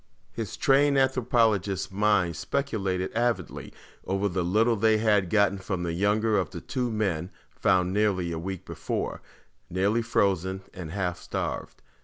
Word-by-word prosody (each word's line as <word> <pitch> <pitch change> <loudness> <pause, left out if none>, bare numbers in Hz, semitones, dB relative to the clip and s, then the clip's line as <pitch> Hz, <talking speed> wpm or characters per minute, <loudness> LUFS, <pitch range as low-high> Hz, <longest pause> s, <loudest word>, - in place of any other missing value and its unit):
His 110 -4 -5
trained 140 +1 +4
anthropologist's 115 -8 +1
mind 100 -4 +2
speculated 95 - -2
avidly 115 -5 -1 0.3
over 95 +1 0
the 90 -2 -1
little 110 +7 +3
they 110 +1 +3
had 105 -4 +2
gotten 100 -1 +3
from 95 -2 -3
the 85 -1 -2
younger 105 +3 +2
of 90 - -2
the - - -7
two 125 -2 -2
men 95 -6 -1 0.2
found 90 0 +2
nearly 100 -4 +1
a 80 - -3
week 95 +1 -5
before, - - -4 0.5
nearly 100 +6 +1
frozen 95 -4 0
and 90 -4 -7
half 90 0 -2
starved. - - -5
100 Hz, 145 wpm, -27 LUFS, 95-110 Hz, 0.5 s, trained